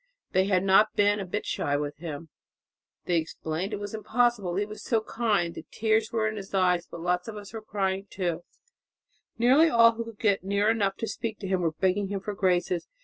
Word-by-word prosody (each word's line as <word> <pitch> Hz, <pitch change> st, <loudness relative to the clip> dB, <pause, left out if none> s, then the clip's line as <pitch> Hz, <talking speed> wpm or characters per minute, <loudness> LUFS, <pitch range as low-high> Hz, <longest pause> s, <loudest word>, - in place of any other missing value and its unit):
They 190 Hz, 0 st, +3 dB
had 190 Hz, -2 st, +2 dB
not 195 Hz, +3 st, +4 dB
been 205 Hz, 0 st, +3 dB
a 195 Hz, -, -3 dB
bit 210 Hz, +4 st, -3 dB
shy 145 Hz, 0 st, -1 dB
with 145 Hz, 0 st, -4 dB
him, 160 Hz, 0 st, -7 dB, 0.8 s
they 175 Hz, -, +2 dB
explained 160 Hz, +3 st, -3 dB
it 210 Hz, -, -3 dB
was 205 Hz, +2 st, -6 dB
impossible, 220 Hz, -3 st, +1 dB
he 205 Hz, +2 st, 0 dB
was 215 Hz, +1 st, -9 dB
so 225 Hz, -3 st, +1 dB
kind. 210 Hz, -7 st, 0 dB
'The 160 Hz, -, -10 dB
tears 220 Hz, 0 st, +1 dB
were 220 Hz, -1 st, +1 dB
in 215 Hz, 0 st, -3 dB
his 195 Hz, -1 st, -6 dB
eyes 180 Hz, -2 st, +2 dB
but 170 Hz, -, -8 dB
lots 180 Hz, +1 st, 0 dB
of 220 Hz, -1 st, -6 dB
us 205 Hz, +1 st, -10 dB
were 225 Hz, -, -5 dB
crying 195 Hz, -2 st, -2 dB
too,' 175 Hz, -3 st, -2 dB, 0.9 s
nearly 265 Hz, +8 st, +5 dB
all 230 Hz, -4 st, +6 dB
who 230 Hz, 0 st, -5 dB
could 225 Hz, -2 st, -10 dB
get 200 Hz, -4 st, +1 dB
near 200 Hz, +2 st, +2 dB
enough 200 Hz, -4 st, 0 dB
to 225 Hz, -, -3 dB
speak 220 Hz, -1 st, -4 dB
to 195 Hz, -, -4 dB
him 185 Hz, -1 st, 0 dB
were 165 Hz, -2 st, 0 dB
begging 190 Hz, +4 st, +1 dB
him 200 Hz, 0 st, -3 dB
for 205 Hz, +2 st, -5 dB
graces. 180 Hz, -3 st, 0 dB
200 Hz, 215 wpm, -27 LUFS, 180-220 Hz, 0.9 s, all